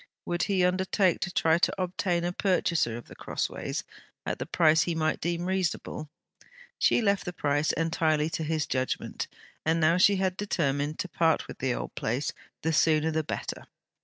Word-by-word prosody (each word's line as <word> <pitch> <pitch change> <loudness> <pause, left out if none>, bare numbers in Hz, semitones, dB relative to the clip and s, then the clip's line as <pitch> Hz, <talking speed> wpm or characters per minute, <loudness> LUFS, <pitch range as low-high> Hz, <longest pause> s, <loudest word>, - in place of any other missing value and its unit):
Would 175 0 -1
he 190 -3 +2
undertake 185 0 +2
to 190 - -2
try 165 -1 +3
to 185 - +1
obtain 180 -1 0
a 175 0 -1
purchaser 170 - +1
of 120 - -9
The - - -12
Crossways, - - -3 0.4
at - - -2
the - - -4
price 160 -2 +4
he 170 - 0
might 155 -1 0
deem 170 +1 -1
reasonable? 180 -4 -2 0.7
She 240 - +3
left 200 -2 +2
the 180 - -4
price 145 -1 +1
entirely 160 -2 +1
to 160 - -2
his 155 -1 0
judgement. 130 -1 -2 0.4
And 160 +1 +2
now 165 +2 +4
she 200 +2 +6
had 190 -1 0
determined 150 -7 -1
to - - -3
part 165 -2 +1
with - - -9
the 130 -1 0
old - - -5
place, 125 +7 -2 0.3
the 160 +1 +1
sooner 155 0 +3
the 160 0 0
better! - - -5
165 Hz, 180 wpm, -28 LUFS, 155-180 Hz, 0.7 s, she